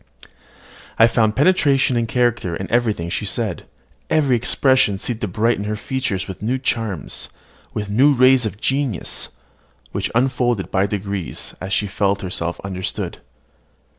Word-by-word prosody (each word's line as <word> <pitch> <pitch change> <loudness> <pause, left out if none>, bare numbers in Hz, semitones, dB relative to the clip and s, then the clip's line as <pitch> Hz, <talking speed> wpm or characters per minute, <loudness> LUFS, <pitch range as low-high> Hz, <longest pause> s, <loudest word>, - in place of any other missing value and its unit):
I 115 - +7
found 110 -2 +2
penetration 140 -5 +3
and 115 -1 0
character 120 -7 0
in 95 +3 -6
everything 110 -8 0
she 105 - -2
said: 110 -4 -2 0.4
every 145 -5 +3
expression 125 -2 +3
seemed 115 +3 -3
to 105 - -1
brighten 105 +2 0
her 105 +1 -2
features 105 -4 -3
with 95 - -8
new 120 +5 0
charms, 110 - -3 0.5
with 105 -1 -2
new 125 +9 +4
rays 130 -2 +5
of 100 0 -8
genius, 135 -5 -2 0.6
which - - -2
unfolded 120 -4 +1
by 95 +1 +2
degrees, 100 -3 -4
as 95 - -5
she 105 - +1
felt 100 0 0
herself 85 -2 -2
understood. 95 -1 -3
110 Hz, 140 wpm, -20 LUFS, 100-125 Hz, 0.6 s, I